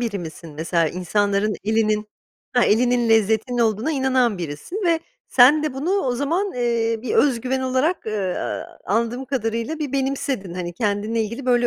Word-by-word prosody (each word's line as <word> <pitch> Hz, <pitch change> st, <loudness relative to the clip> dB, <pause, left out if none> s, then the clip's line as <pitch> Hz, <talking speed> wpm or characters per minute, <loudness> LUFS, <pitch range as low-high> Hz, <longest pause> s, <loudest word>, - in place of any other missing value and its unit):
biri 225 Hz, -5 st, -2 dB
misin? 165 Hz, -1 st, -8 dB
Mesela 165 Hz, +1 st, +1 dB
insanların 200 Hz, +4 st, 0 dB
elinin 215 Hz, 0 st, +1 dB, 0.5 s
ha, 245 Hz, -1 st, +4 dB
elinin 240 Hz, +2 st, +2 dB
lezzetinin 225 Hz, +2 st, +2 dB
olduğuna 225 Hz, +6 st, +1 dB
inanan 260 Hz, -6 st, +1 dB
birisin 170 Hz, -, -5 dB
ve 330 Hz, -1 st, +3 dB, 0.3 s
sen 275 Hz, +5 st, +6 dB
de 300 Hz, -4 st, -2 dB
bunu 290 Hz, +7 st, -2 dB
o 380 Hz, -11 st, +1 dB
zaman, 335 Hz, +10 st, -1 dB
eee, 230 Hz, -2 st, 0 dB
bir 245 Hz, -, -2 dB
özgüven 260 Hz, -1 st, +2 dB
olarak, 260 Hz, +5 st, 0 dB
eee, 200 Hz, -4 st, -2 dB, 0.5 s
anladığım 235 Hz, +5 st, -1 dB
kadarıyla 235 Hz, +3 st, -2 dB
bir 295 Hz, -4 st, -3 dB
benimsedin 265 Hz, -8 st, -2 dB
hani 175 Hz, -1 st, -4 dB
kendinle 210 Hz, +2 st, 0 dB
ilgili 230 Hz, +5 st, -5 dB
böyle 245 Hz, -1 st, +3 dB
235 Hz, 155 wpm, -22 LUFS, 210-265 Hz, 0.5 s, sen